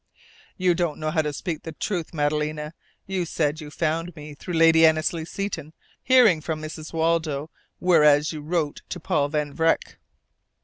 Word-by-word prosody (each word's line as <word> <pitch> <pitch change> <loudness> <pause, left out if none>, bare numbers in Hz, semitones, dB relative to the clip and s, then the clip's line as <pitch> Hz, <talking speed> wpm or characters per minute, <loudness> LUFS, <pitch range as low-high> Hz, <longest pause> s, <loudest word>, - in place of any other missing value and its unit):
"You 185 -1 +3
don't 170 -3 -1
know 155 0 -2
how 160 -1 +2
to 150 -1 -2
speak 155 +2 -4
the 160 - -7
truth, 175 0 -3
Madalena! 150 0 -1 0.3
You 190 -1 -2
said 155 -1 -1
you 150 - -8
found 165 +2 -2
me 150 -1 -9
through 170 +4 -6
Lady 165 0 +6
Annesley 160 +1 +3
Seton 185 -5 -5 0.3
hearing 235 -11 +5
from 155 0 -3
Mrs. 155 0 -7
Waldo, 160 -2 0 0.3
whereas 150 -4 +4
you 155 - -6
wrote 155 -1 -2
to 180 - -5
Paul 145 -2 0
Van 150 -1 -2
Vreck." 165 0 0
160 Hz, 165 wpm, -24 LUFS, 150-170 Hz, 0.3 s, Lady